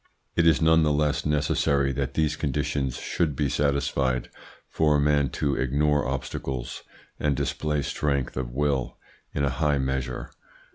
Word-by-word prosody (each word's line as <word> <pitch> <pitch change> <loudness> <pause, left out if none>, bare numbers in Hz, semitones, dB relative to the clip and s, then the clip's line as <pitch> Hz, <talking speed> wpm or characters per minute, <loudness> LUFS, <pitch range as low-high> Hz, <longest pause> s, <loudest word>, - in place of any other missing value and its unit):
It 85 -1 +4
is 80 0 +4
none 80 0 +5
the 75 -1 +3
less 75 0 +1
necessary 70 -2 +2
that 70 0 -3
these 80 -2 +1
conditions 70 -2 -1
should 80 -5 -1
be 70 0 0
satisfied 70 -2 0 0.4
for 75 -1 +2
a - - +3
man 70 -1 +3
to 70 -2 +1
ignore 70 +2 +1
obstacles 65 -1 -4 0.4
and 75 -2 +1
display 75 0 -1
strength 70 -2 -1
of 65 -2 -3
will 70 0 -1 0.4
in 70 - 0
a 70 - 0
high 75 -2 +3
measure. 65 -1 -2
70 Hz, 150 wpm, -26 LUFS, 65-75 Hz, 0.4 s, none